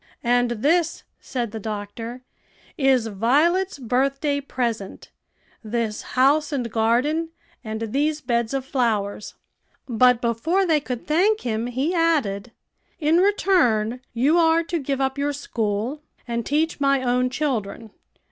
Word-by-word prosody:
"And 245 Hz, 0 st, +2 dB
this," 310 Hz, +9 st, +1 dB, 0.2 s
said 240 Hz, -5 st, -4 dB
the 220 Hz, -, -5 dB
doctor, 220 Hz, +3 st, -6 dB, 0.5 s
"is 265 Hz, -4 st, +3 dB
Violet's 290 Hz, -, +1 dB
birthday 275 Hz, +3 st, 0 dB
present 235 Hz, -7 st, -4 dB, 0.5 s
this 220 Hz, -1 st, -2 dB, 0.2 s
house 290 Hz, +5 st, +4 dB
and 245 Hz, -5 st, -2 dB
garden, 250 Hz, +9 st, +1 dB, 0.3 s
and 220 Hz, -1 st, -5 dB
these 300 Hz, +2 st, +1 dB
beds 235 Hz, -2 st, -1 dB
of 265 Hz, -1 st, -2 dB
flowers." 220 Hz, -7 st, -1 dB, 0.5 s
But 250 Hz, 0 st, +4 dB
before 245 Hz, -, +1 dB
they 320 Hz, -4 st, +3 dB
could 250 Hz, -4 st, -6 dB
thank 390 Hz, +9 st, +2 dB
him, 230 Hz, -1 st, -2 dB
he 265 Hz, +8 st, -1 dB
added, 275 Hz, -, +1 dB, 0.5 s
"In 315 Hz, +1 st, +3 dB
return, 295 Hz, -, +2 dB
you 280 Hz, +8 st, +3 dB
are 330 Hz, 0 st, +4 dB
to 335 Hz, 0 st, -2 dB
give 275 Hz, -1 st, -2 dB
up 265 Hz, +1 st, -1 dB
your 290 Hz, +1 st, 0 dB
school, 235 Hz, 0 st, -3 dB, 0.3 s
and 235 Hz, 0 st, -2 dB
teach 305 Hz, +1 st, 0 dB
my 275 Hz, -1 st, +2 dB
own 250 Hz, 0 st, +1 dB
children. 235 Hz, -6 st, -3 dB
255 Hz, 130 wpm, -23 LUFS, 230-300 Hz, 0.5 s, house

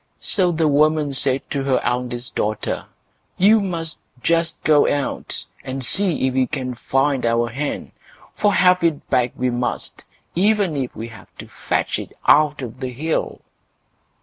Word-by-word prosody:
So 185 Hz, -4 st, +1 dB
the 160 Hz, -1 st, +1 dB
woman 150 Hz, 0 st, +3 dB
said 135 Hz, 0 st, +1 dB
to 140 Hz, -, -1 dB
her 135 Hz, -1 st, +2 dB
eldest 125 Hz, +1 st, -2 dB
daughter, 105 Hz, 0 st, -2 dB, 0.5 s
"You 210 Hz, +4 st, +6 dB
must 165 Hz, -5 st, -3 dB, 0.2 s
just 165 Hz, 0 st, +1 dB
go 150 Hz, -2 st, +4 dB
out 145 Hz, -1 st, -3 dB, 0.2 s
and 130 Hz, -1 st, -4 dB
see 175 Hz, -2 st, +2 dB
if 130 Hz, -, -1 dB
you 130 Hz, -1 st, +2 dB
can 130 Hz, -4 st, -3 dB
find 135 Hz, +2 st, 0 dB
our 115 Hz, 0 st, +1 dB
hen, 140 Hz, +5 st, -4 dB, 0.4 s
for 205 Hz, -, +2 dB
have 180 Hz, -2 st, +4 dB
it 165 Hz, -4 st, 0 dB
back 125 Hz, -1 st, +2 dB
we 125 Hz, 0 st, 0 dB
must, 120 Hz, 0 st, -3 dB, 0.3 s
even 200 Hz, -2 st, +2 dB
if 130 Hz, -3 st, -3 dB
we 115 Hz, +1 st, -6 dB
have 110 Hz, -2 st, -14 dB
to -, -, -9 dB
fetch -, -, -2 dB
it -, -, -8 dB
out 150 Hz, -2 st, +4 dB
of 125 Hz, +1 st, -7 dB
the 130 Hz, -1 st, -4 dB
hill." 155 Hz, +6 st, -2 dB
140 Hz, 160 wpm, -21 LUFS, 125-165 Hz, 0.5 s, You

